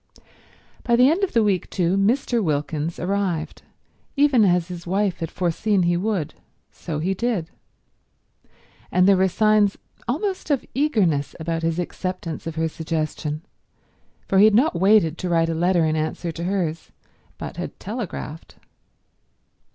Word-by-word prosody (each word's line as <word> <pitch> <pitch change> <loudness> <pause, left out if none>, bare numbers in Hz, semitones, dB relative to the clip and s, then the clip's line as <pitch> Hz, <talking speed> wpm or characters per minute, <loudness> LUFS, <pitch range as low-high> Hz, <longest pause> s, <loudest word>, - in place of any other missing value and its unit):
By 235 - +3
the 250 +2 +6
end 365 +5 0
of 390 - 0
the 230 - +4
week, 195 -4 0
too, 180 -1 +1
Mr. 230 +3 +1
Wilkins 150 0 -2
arrived; 180 -4 -2 0.6
even 280 -5 +5
as 180 -3 +3
his 175 -1 -8
wife 195 0 0
had 165 - -3
foreseen 185 +3 0
he 175 0 +2
would, 185 -4 -1 0.4
so 160 -4 -5
he 175 +6 0
did. 190 -5 -2 1.4
And 180 +1 +4
there 200 -1 +6
were 190 +1 +4
signs 215 +1 +3 0.3
almost 370 - -2
of 280 -4 +1
eagerness 205 - +1
about 165 0 -2
his 165 0 -1
acceptance 175 -2 -4
of 165 - -5
her 160 0 0
suggestion, 155 -1 -3 0.8
for 190 - +3
he 205 - +8
had 215 -1 +5
not 260 +8 +4
waited 180 -3 +3
to 180 - -3
write 165 -1 +2
a - - 0
letter 175 0 +2
in 155 0 +1
answer 160 +2 -2
to 170 +1 -5
hers, 175 -4 -2 0.5
but - - -7
had - - -6
telegraphed. 200 -8 -6
180 Hz, 150 wpm, -23 LUFS, 165-215 Hz, 1.4 s, he